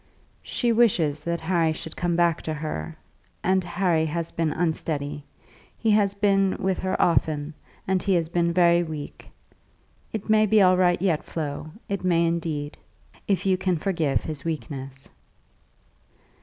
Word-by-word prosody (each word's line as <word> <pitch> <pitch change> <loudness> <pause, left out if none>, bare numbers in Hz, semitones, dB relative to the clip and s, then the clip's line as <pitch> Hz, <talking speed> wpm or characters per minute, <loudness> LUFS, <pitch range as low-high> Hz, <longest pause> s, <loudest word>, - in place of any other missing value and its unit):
"She 240 -2 -1
wishes 185 -11 +3
that 170 0 -2
Harry 165 -2 +1
should 160 0 -8
come 175 -1 -1
back 170 -2 +2
to 155 - -3
her, 150 - -5 0.5
and 185 +1 +2
Harry 175 -2 +1
has 165 +1 -3
been 165 -2 -1
unsteady. 150 -3 -2 0.5
He 225 - +1
has 205 -1 +3
been 195 -1 +2
with 190 0 0
her 185 0 -2
often; 155 -2 +1 0.3
and 190 -1 +1
he 195 0 +1
has 165 -2 +1
been 170 0 +1
very 170 0 +4
weak. 155 -4 -7 0.8
It 215 -3 -5
may 215 0 +4
be 215 +1 +4
all 185 -2 +6
right 180 -1 +3
yet, 170 -4 +1
Flo; 150 -1 -5 0.2
it 200 -2 -3
may 170 -2 +3
indeed, 160 -3 -2 0.5
if 195 -1 0
you 190 -1 +3
can 185 -2 0
forgive 160 -5 0
his 155 -3 -5
weakness." 135 -4 -6
170 Hz, 155 wpm, -25 LUFS, 155-190 Hz, 0.8 s, all